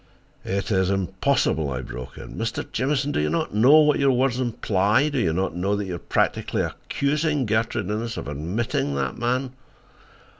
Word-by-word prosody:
"It 100 +4 -2
is 95 -2 +2
impossible," 95 - +1
I 65 -1 -3
broke 65 0 -8
in. - - -9
"Mr. 115 0 -3
Jamieson, 140 +3 0
do - - 0
you 75 - 0
know 145 -2 +4
what 150 -1 +3
your 140 -1 +4
words 130 0 +1
imply? 110 +2 +1
Do 140 -3 -1
you 85 -8 +2
know 95 +3 -1
that 100 0 -2
you 95 - -5
are 85 - -4
practically - - 0
accusing 150 -1 -1
Gertrude 110 0 0
Innes 115 +2 -3
of - - -5
admitting 75 +1 -2
that 65 -2 -2
man?" 125 +2 0
110 Hz, 165 wpm, -24 LUFS, 95-135 Hz, -, know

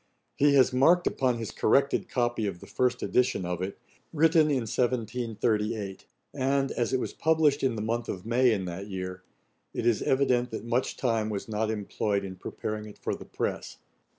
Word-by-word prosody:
He 145 0 +4
has 130 -1 +5
marked 170 +8 +4
upon 125 -2 +1
his 115 -2 -5
corrected 140 +5 +2
copy 120 -3 0
of 90 -3 -5
the - - -11
first 125 -1 0
edition 125 -7 +1
of 90 0 -3
it, 95 +1 -4 0.3
'Written 160 0 +4
in 130 -5 0
1738;' 110 -3 -1 0.3
and, 135 0 +1
as 120 -2 -1
it 130 - +1
was - - -4
published 155 -3 +2
in 130 -3 +1
the 105 - -3
month 115 +1 -2
of 90 +1 -5
May 120 +2 +3
in 100 -4 -1
that 90 +3 -6
year, 90 -2 -5 0.5
it - - -2
is 120 -3 +3
evident 125 -2 +2
that 110 0 -6
much 120 +2 -1
time 115 -4 0
was 100 -2 -4
not 110 0 -1
employed 105 -1 -1
in 95 -1 -7
preparing 105 +3 -5
it 105 - -12
for - - -3
the - - -8
press. - - -4
115 Hz, 185 wpm, -28 LUFS, 105-130 Hz, 0.5 s, has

